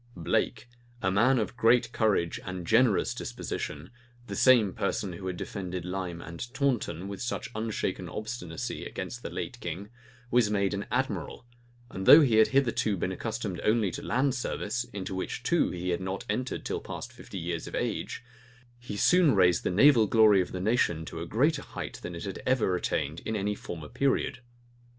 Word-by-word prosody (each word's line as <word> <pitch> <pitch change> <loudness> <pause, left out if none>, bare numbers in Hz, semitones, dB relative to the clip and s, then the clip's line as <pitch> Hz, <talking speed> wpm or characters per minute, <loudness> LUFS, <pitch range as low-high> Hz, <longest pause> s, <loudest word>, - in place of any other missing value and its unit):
Blake, 85 +7 -1 0.4
a 95 - +2
man 115 +7 +4
of 115 +1 -2
great 120 0 +3
courage 105 -8 +1
and 95 -1 -5
a - - -8
generous 115 +2 +3
disposition 75 +3 -5 0.3
the - - -6
same 115 -7 +5
person 100 -1 -2
who 95 +2 -7
had 90 -1 -3
defended 90 -3 -5
Lyme 90 -2 -4
and 85 +9 -7
Taunten 120 - 0
with 100 -1 -6
such 125 - -3
unshaken 110 0 -3
obstinacy 105 -7 -5
against 95 +6 -6
the - - -5
late 125 -3 -5
king, 90 +1 -5 0.4
was 120 -3 +4
made 100 -2 +1
an 100 0 -3
admiral; 130 0 -2 0.5
and 95 0 -5
though 155 - +11
he 120 -7 +3
had 110 - +7
hitherto 120 -6 +1
been 95 - -1
accustomed 105 -3 -4
only 110 -3 +2
to - - -6
land 130 +2 +1
service, 120 -2 -2
into 100 -5 -6
which, 95 - -4
too, - - +2
he 90 +1 -4
had 90 +1 0
not 95 +1 -4
entered 125 +5 -2
till - - -2
past - - -7
fifty - - -9
years 85 -1 -3
of - - -6
age, - - -3 0.6
he 120 -4 -6
soon 175 - +5
raised 90 -2 +4
the - - 0
naval 115 +3 +6
glory 105 -3 +6
of 90 - -4
the 90 - -4
nation 90 -6 +1
to 80 - -6
a 85 - -5
greater 140 - +2
height - - -7
than 90 - -6
it 85 - -6
had 95 - -5
ever 125 -8 +2
attained 80 -3 -2
in 110 - -4
any 105 0 0
former 80 -6 -7
period. 135 - 0
105 Hz, 185 wpm, -29 LUFS, 90-120 Hz, 0.6 s, though